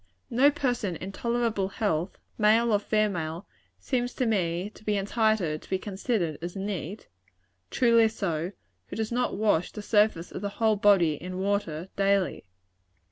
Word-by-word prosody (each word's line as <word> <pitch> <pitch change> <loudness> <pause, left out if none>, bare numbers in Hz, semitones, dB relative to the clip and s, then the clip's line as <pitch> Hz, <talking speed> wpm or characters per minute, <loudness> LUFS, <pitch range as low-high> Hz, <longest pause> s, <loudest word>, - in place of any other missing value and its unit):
No 260 +5 +5
person 245 -10 -1
in 190 - -6
tolerable 230 -2 0
health, 190 -4 -2 0.2
male 225 +2 +4
or 205 - +4
female, 195 -5 -1 0.3
seems 245 -2 -2
to 255 - 0
me 185 -3 0
to - - -17
be 210 -1 0
entitled 200 -6 +1
to - - -17
be 190 - +1
considered 190 - -2
as 175 +2 -5
neat 195 -1 -5 0.6
truly 230 -2 +4
so 175 -6 -2 0.4
who - - -7
does 220 +1 -2
not 250 +1 0
wash 205 -5 +2
the 210 - -7
surface 205 -6 +2
of - - -6
the 205 - -2
whole 220 -1 +3
body 195 -6 +4
in 185 +1 -5
water, 190 -4 -1
daily. 195 -1 +1
205 Hz, 155 wpm, -27 LUFS, 180-220 Hz, 0.6 s, No